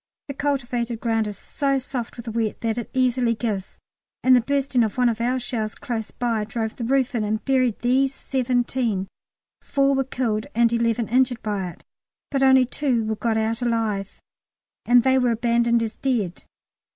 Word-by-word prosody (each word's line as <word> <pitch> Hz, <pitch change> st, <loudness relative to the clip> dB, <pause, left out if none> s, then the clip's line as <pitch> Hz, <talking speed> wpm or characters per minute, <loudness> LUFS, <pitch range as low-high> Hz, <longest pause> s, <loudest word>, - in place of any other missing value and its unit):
The -, -, -3 dB
cultivated 245 Hz, -5 st, -2 dB
ground 225 Hz, -2 st, 0 dB
is 205 Hz, -, -6 dB
so 275 Hz, -2 st, -1 dB
soft 255 Hz, -3 st, -4 dB
with 235 Hz, -, -8 dB
the 230 Hz, -, -4 dB
wet 225 Hz, -1 st, -2 dB
that 230 Hz, 0 st, -1 dB
it 235 Hz, -, -6 dB
easily 250 Hz, -2 st, +2 dB
gives, 210 Hz, -4 st, -3 dB, 0.5 s
and 255 Hz, 0 st, +6 dB
the 245 Hz, -, +5 dB
bursting 275 Hz, -1 st, +1 dB
of 220 Hz, +1 st, -2 dB
one 250 Hz, -1 st, +4 dB
of 230 Hz, 0 st, -2 dB
our 250 Hz, +2 st, +1 dB
shells 230 Hz, -3 st, -3 dB
close 225 Hz, -3 st, -4 dB
by 230 Hz, -3 st, -1 dB
drove 220 Hz, +1 st, -3 dB
the 240 Hz, -, -5 dB
roof 260 Hz, +1 st, +1 dB
in 230 Hz, -3 st, 0 dB
and 215 Hz, +1 st, -2 dB
buried 255 Hz, -4 st, +2 dB
these 260 Hz, +2 st, +3 dB
seventeen 245 Hz, -6 st, -1 dB, 0.5 s
four 275 Hz, 0 st, +2 dB
were 270 Hz, 0 st, +2 dB
killed 235 Hz, -4 st, -2 dB
and 235 Hz, 0 st, +3 dB
eleven 230 Hz, -1 st, +1 dB
injured 250 Hz, 0 st, +1 dB
by 200 Hz, -4 st, -2 dB
it, -, -, -14 dB, 0.5 s
but 275 Hz, -2 st, 0 dB
only 265 Hz, -1 st, +6 dB
two 250 Hz, -2 st, 0 dB
were 220 Hz, 0 st, -1 dB
got 220 Hz, +1 st, 0 dB
out 225 Hz, +2 st, -1 dB
alive, 220 Hz, -5 st, -1 dB, 0.7 s
and 245 Hz, -1 st, +6 dB
they 260 Hz, 0 st, +4 dB
were 250 Hz, -1 st, +2 dB
abandoned 235 Hz, 0 st, +2 dB
as 225 Hz, 0 st, -5 dB
dead. 225 Hz, -10 st, -2 dB
235 Hz, 185 wpm, -23 LUFS, 225-255 Hz, 0.7 s, and